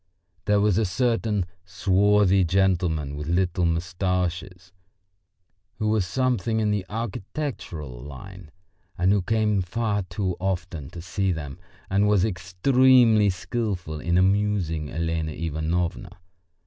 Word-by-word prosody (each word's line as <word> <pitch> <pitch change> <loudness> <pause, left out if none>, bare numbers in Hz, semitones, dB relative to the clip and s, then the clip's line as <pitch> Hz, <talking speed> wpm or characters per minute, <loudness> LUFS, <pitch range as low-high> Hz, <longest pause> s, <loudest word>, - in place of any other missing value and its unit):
There 105 0 +3
was 105 -1 +3
a - - +2
certain 110 -2 0 0.2
swarthy 100 0 +3
gentleman 85 -5 +1
with 75 +1 -6
little 90 0 +1
moustaches 90 +1 -2 1.1
who 110 - -1
was 105 -4 +1
something 115 +1 0
in 105 -1 +1
the 100 -3 -2
architectural 105 - -5
line, 80 +6 -10 0.5
and 90 +2 +3
who 100 -1 +3
came 105 0 +1
far 105 +2 -1
too 95 -1 -3
often 90 -6 -3
to 85 - -9
see 95 +2 -1
them, 75 -5 -5 0.3
and 100 +2 +2
was 105 -2 +3
extremely 110 +4 +4
skilful 90 -3 -3
in 85 +2 0
amusing 95 -5 +1
Elena 80 -1 -2
Ivanovna. 80 +2 -2
95 Hz, 120 wpm, -25 LUFS, 85-105 Hz, 1.1 s, extremely